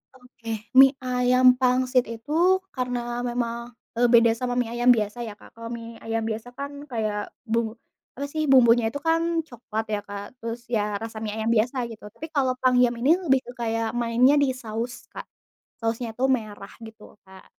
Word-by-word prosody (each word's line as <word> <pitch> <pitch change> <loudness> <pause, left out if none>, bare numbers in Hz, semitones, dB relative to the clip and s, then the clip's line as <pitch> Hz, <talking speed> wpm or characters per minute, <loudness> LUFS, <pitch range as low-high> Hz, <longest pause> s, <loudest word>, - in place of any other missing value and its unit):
Oke. 230 -4 -8 0.2
Mie 270 0 +8
ayam 250 0 +2
pangsit 255 0 +2
itu 230 +5 -8 0.4
karena 250 -2 -2 0.3
memang, 235 0 -3 0.2
eee, 245 +1 +4
beda 230 -1 +7
sama 245 +2 -2
mie 240 -2 -1
ayam 240 +1 +2
biasa 210 +2 -3
ya, 215 - -7
Kak. - - -17
Kalau 230 0 -8
mie 230 0 -8
ayam 225 0 -2
biasa 225 +2 -5
kan 285 +1 -7
kayak 215 -3 -3
bumbu 225 -1 -1 0.4
apa 280 - -3
sih, 305 0 -2
bumbunya 235 -3 +5
itu 285 - -5
kan 330 0 +1
coklat 225 -5 -5
ya, 205 - -1
Kak. 205 +5 -9
Terus 230 +1 -6
ya 210 -3 -1
rasa 225 0 -7
mie 210 -1 -3
ayam 220 +1 -1
biasa 240 +3 +1
gitu. 210 -1 -10
Tapi 230 +10 -9
kalau 265 -3 +2
pangyam 250 -1 +3
ini 270 +7 +4
lebih 320 -8 +2
ke 245 - -8
kayak 225 -1 -1
mainnya 240 +3 +3
di 275 - +3
saus, 235 +1 -5
Kak. - - -8 0.5
Sausnya 230 +1 -2
itu 260 - +1
merah 215 -6 -2
gitu, 220 -1 -12
Kak. 190 0 -16
235 Hz, 180 wpm, -25 LUFS, 225-255 Hz, 0.5 s, Mie